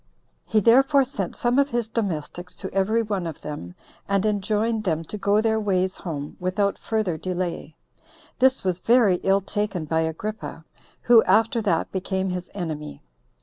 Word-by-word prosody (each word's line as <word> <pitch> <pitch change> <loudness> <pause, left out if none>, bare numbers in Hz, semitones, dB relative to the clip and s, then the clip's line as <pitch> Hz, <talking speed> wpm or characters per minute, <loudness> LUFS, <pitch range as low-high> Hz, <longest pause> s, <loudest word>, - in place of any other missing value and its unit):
He 220 - +2
therefore 270 +6 +5
sent 205 -9 -4
some 245 +2 +1
of 280 0 +3
his 240 -3 -1
domestics 180 -5 -4
to 190 - -6
every 210 +4 +2
one 200 -5 -2
of 160 - -7
them, 90 -13 -7 0.3
and 200 0 +2
enjoined 215 +2 0
them 165 -4 -1
to 165 - -7
go 205 +1 +2
their 220 0 +1
ways 190 -3 0
home 150 -5 -6
without 195 +2 0
further 215 -8 -2
delay. 175 -4 -4 0.6
This 260 +1 +3
was 185 -2 -1
very 230 -5 +4
ill 195 +2 +2
taken 200 -3 -2
by 160 +1 0
Agrippa, 160 +1 -5 0.4
who 240 -2 +7
after 225 +1 +3
that 175 -6 0
became 190 0 -2
his 180 0 -5
enemy. 155 - -5
195 Hz, 160 wpm, -24 LUFS, 175-220 Hz, 0.6 s, who